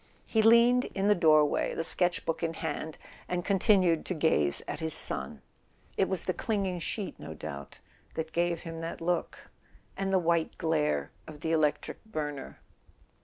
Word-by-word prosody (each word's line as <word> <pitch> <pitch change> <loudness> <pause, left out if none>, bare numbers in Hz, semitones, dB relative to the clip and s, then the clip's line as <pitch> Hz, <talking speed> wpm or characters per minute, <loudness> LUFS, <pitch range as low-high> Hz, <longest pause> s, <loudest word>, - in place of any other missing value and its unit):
He 220 - +1
leaned 235 +3 +5
in 200 +1 +1
the - - +7
doorway, 155 -5 +3
the 165 - -2
sketch 175 +2 +2
book 165 - -2
in 165 -1 -2
hand, 160 0 -4 0.3
and 180 -1 -3
continued 190 -4 +3
to 185 - -2
gaze 75 - +3
at - - -5
his 160 -1 +1
son. 65 - +1 0.5
It 190 - +1
was 190 -3 -1
the 185 - 0
clinging 195 -5 -2
sheet, 195 +3 -5
no 80 - -8
doubt, 70 -2 -8 0.4
that 160 0 -4
gave 170 0 0
him 165 -1 -7
that 165 0 -5
look... 175 0 -3 0.4
and 195 0 -2
the 190 - +4
white 170 -2 0
glare 150 - 0 0.2
of 150 -1 -11
the 160 - -2
electric 150 -3 0
burner. 150 -10 -6
165 Hz, 170 wpm, -29 LUFS, 155-190 Hz, 0.5 s, the